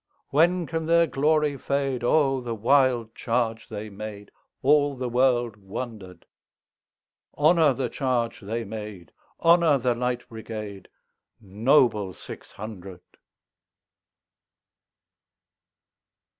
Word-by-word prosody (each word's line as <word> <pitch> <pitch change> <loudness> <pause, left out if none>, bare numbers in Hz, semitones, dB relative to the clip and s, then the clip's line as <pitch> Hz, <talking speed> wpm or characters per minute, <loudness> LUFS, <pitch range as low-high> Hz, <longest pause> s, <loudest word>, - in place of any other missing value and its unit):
When 170 +4 +3
can 160 0 -3
their 170 0 +5
glory 150 0 +1
fade?O 135 0 +1
the 120 -2 -4
wild 120 -1 +2
charge 115 -2 -2
they 110 0 -6
made! 105 0 -8 0.3
All 145 +1 +3
the 125 -1 -4
world 120 -2 +1
wonder'd. 100 -2 -8 1.1
Honor 155 0 +4
the 130 0 -2
charge 120 -2 -1
they 115 +3 -4
made! 105 -5 -8 0.3
Honor 165 -3 +5
the 125 -1 +1
Light 125 +1 -3
Brigade, 110 -3 -8 0.5
Noble 105 -1 +2
six - - -11
hundred! 100 -4 -9
120 Hz, 95 wpm, -25 LUFS, 110-140 Hz, 1.1 s, their